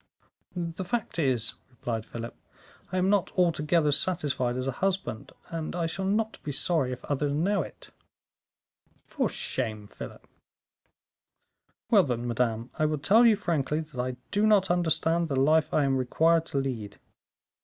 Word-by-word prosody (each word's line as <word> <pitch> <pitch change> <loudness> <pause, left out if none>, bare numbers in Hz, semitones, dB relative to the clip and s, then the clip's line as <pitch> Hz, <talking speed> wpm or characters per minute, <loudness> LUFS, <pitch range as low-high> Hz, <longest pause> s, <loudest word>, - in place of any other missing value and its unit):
"The 170 0 -3
fact 225 -2 -2
is," 130 -7 0 0.2
replied 115 -3 -4
Philip, 115 0 -6 0.6
"I 185 - -1
am 185 +2 +3
not 200 -4 +2
altogether 165 -3 +3
satisfied 140 -7 0
as 130 - -2
a 135 - 0
husband, 185 - -1 0.2
and 165 0 -4
I 170 -1 0
shall 190 +4 -3
not 220 +3 0
be 145 - -4
sorry 140 -2 0
if 125 0 -7
others 145 0 0
know 185 +6 +1
it." - - -10 1.1
"For - - -1
shame, 110 -5 -3
Philip." - - -10 1.6
"Well, 210 -4 +8
then, 120 -6 -2
madame, 115 0 -1
I 155 - +3
will 155 0 0
tell 210 - +5
you 225 - +6
frankly 160 -6 -1
that 150 -5 -5
I 125 0 -3
do 205 +1 +3
not 195 -4 +4
understand 165 -1 +2
the 140 - -2
life 155 +3 +3
I 150 - +3
am 135 -1 +2
required 160 +6 +2
to - - -3
lead." 120 -7 -3
155 Hz, 155 wpm, -28 LUFS, 130-180 Hz, 1.6 s, Well